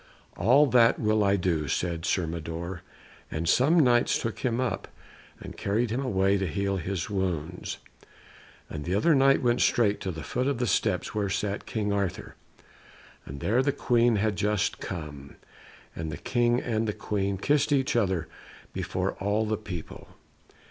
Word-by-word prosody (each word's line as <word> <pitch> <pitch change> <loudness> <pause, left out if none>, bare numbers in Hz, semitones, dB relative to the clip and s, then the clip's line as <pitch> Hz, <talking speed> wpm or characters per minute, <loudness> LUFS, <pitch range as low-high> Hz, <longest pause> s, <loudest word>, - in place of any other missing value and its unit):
"All 125 +11 +5
that 120 -3 +4
will 110 -1 +2
I 100 0 +3
do," 85 -5 0
said 85 +3 -2
Sir 90 - +1
Mador, 85 +2 -5 0.5
and 80 +2 -3
some 145 - +4
Knights 120 -5 +4
took 115 - -4
him 120 -2 -1
up, 130 -1 -2 0.5
and - - -9
carried 110 +3 -1
him 130 +4 -1
away 95 -5 +2
to 95 - -1
heal 100 +3 -1
his 95 0 -3
wounds. 90 -4 -3 0.9
And 75 - -6
the 90 +4 -1
other 160 +11 +4
knight 135 -1 +4
went 120 0 +2
straight 105 -4 +3
to 95 - -3
the 80 -3 -5
foot 125 +2 -1
of 140 - 0
the 125 - 0
steps 105 - 0
where 105 -2 -1
sat 100 0 -2
King 105 -2 -1
Arthur, 100 -3 -2 0.9
and 70 +1 -8
there 115 +5 +2
the 140 +2 +1
Queen 120 -3 +2
had 105 -1 0
just 105 -1 0
come, 75 -6 -7 0.6
and 80 -1 -4
the 70 - -5
King 120 -1 +1
and 115 -3 -1
the 105 - -1
Queen 100 -1 -1
kissed 145 +8 +1
each 135 -3 +2
other 95 -7 +1 0.5
before - - -2
all 105 +3 0
the 110 0 0
people. 95 -6 -8
100 Hz, 170 wpm, -27 LUFS, 90-120 Hz, 0.9 s, All